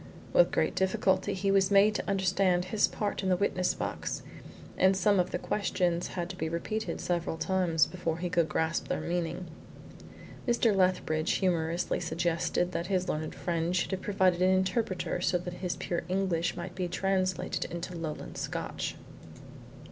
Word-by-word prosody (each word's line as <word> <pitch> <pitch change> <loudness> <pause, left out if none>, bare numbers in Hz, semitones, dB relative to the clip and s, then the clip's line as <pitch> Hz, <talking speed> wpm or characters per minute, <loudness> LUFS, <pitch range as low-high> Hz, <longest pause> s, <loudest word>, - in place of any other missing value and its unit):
With - - +6
great - - +1
difficulty 190 +1 +1
he 195 +1 0
was 195 -1 +4
made 200 +1 +5
to - - -3
understand 185 -2 +2
his 205 +3 +2
part 205 -2 -2
in 190 - -1
the 180 - +3
witness 185 -1 +1
box, - - -4 0.5
and 190 0 +4
some 200 +1 +3
of 180 - +2
the - - -2
questions 180 -4 0
had 175 -1 -1
to - - -8
be 160 -3 -2
repeated 215 +7 -3
several 170 -2 -1
times 165 -2 +2
before 170 -3 -3
he 180 +1 -2
could 170 -2 +1
grasp 160 +1 0
their - - -1
meaning. 175 +1 -2 1.0
Mr. 235 -3 +3
Lethbridge 180 -4 +2
humorously 170 -2 0
suggested 170 +1 0
that 170 -1 -3
his 185 -2 0
learned 155 0 -3
friend 170 0 -1
should 180 - 0
have 190 -1 -2
provided 185 -3 +2
an 185 - +5
interpreter 185 -1 0
so 180 0 +2
that 180 0 -6
his 180 -1 -3
pure 175 -1 -2
English 185 -3 0
might 175 +1 -5
be 180 -1 -2
translated 185 0 0
into 170 +1 -5
Lowland 155 - -5
Scotch. - - -3
180 Hz, 165 wpm, -30 LUFS, 170-190 Hz, 1.0 s, With